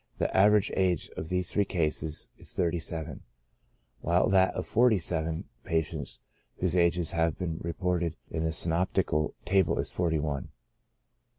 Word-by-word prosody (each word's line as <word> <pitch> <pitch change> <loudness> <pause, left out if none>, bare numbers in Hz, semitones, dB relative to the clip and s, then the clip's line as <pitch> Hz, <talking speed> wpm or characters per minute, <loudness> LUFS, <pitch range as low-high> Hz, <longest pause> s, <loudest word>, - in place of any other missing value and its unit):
The - - -1
average 105 +1 +5
age 90 -4 +1
of 80 - -5
these 90 -1 0
three 105 - +3
cases 80 -4 -2
is - - 0
thirty 85 -1 +1
seven, 80 -1 -4 0.8
while 85 +7 +2
that 95 -1 +5
of 90 - -3
the - - -16
forty 115 -1 +4
seven 80 -2 -1 0.2
patients 80 -2 -2 0.4
whose 90 -1 0
ages 85 -2 +2
have 80 -2 0
been 85 -3 -3
re 85 0 -3
ported 90 -3 -1 0.2
in 80 0 -2
the 80 - 0
synoptical 80 -2 0
table 95 -4 +2
is - - 0
forty 85 -3 0
one. 75 -2 -3
85 Hz, 160 wpm, -29 LUFS, 80-90 Hz, 0.8 s, average